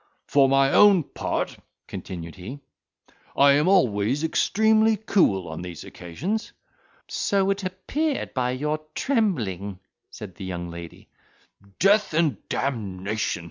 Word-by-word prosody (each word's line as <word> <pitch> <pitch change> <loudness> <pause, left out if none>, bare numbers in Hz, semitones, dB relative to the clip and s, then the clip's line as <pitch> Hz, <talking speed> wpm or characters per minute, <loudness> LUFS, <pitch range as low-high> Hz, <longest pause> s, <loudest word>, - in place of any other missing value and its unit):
"For 140 -2 +4
my 135 0 +4
own 200 -5 +6
part," - - -3 0.3
continued 85 -3 -7
he, 105 +10 -8 0.8
"I 140 0 +7
am 145 +4 +3
always 130 - +2
extremely 220 +6 +3
cool 170 - +2
on 80 +1 -6
these 90 -2 -7
occasions." 175 - -5 0.5
"So 195 -1 +1
it 195 0 -3
appeared, 265 +11 -2
by 125 -1 0
your 150 +4 -1 0.2
trembling," 115 - -1 0.3
said 100 -4 -9
the 95 - -8
young 85 -2 -5
lady. 85 0 -10 0.7
"Death 200 -3 +3
and 160 -3 +2
d—ion!" 100 -9 -3
140 Hz, 120 wpm, -24 LUFS, -, 0.8 s, I